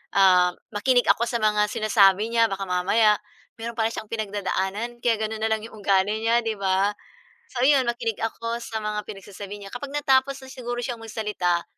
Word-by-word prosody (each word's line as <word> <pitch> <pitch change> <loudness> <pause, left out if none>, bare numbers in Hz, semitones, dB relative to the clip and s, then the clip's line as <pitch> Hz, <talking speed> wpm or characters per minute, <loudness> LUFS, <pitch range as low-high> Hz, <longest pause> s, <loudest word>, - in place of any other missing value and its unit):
ah, 180 -2 +5 0.2
makinig 245 +4 +2
ako 235 - +4
sa 235 -2 -2
mga 210 -1 +3
sinasabi 210 -1 +3
niya, 230 -1 +4
baka 195 -1 -4
mamaya 210 +4 +3 0.4
mayro'n 230 +1 -5
pala 225 0 +1
siyang 220 -1 -7
pinagdadaanan 210 +2 -3
kaya 235 -2 +2
gano'n 220 0 -3
na 220 - +2
lang 220 0 +1
'yong 225 - -12
ugali 200 +2 +2
niya, 230 +1 +3
'di 220 - -1
ba. 195 +2 +2 0.6
So 245 -1 -2
'yon 270 -2 +4
makinig 235 -2 -2
ako 230 +1 -3
sa 225 - -5
mga 210 0 -2
pinagsasabi 200 0 -8
niya. 195 - -9
Kapag 275 +3 -6
natapos 270 -1 +2
na 260 - -11
siguro 245 -1 -5
siyang 240 -2 -4
magsalita, 210 -6 -1
220 Hz, 185 wpm, -24 LUFS, 200-235 Hz, 0.6 s, ah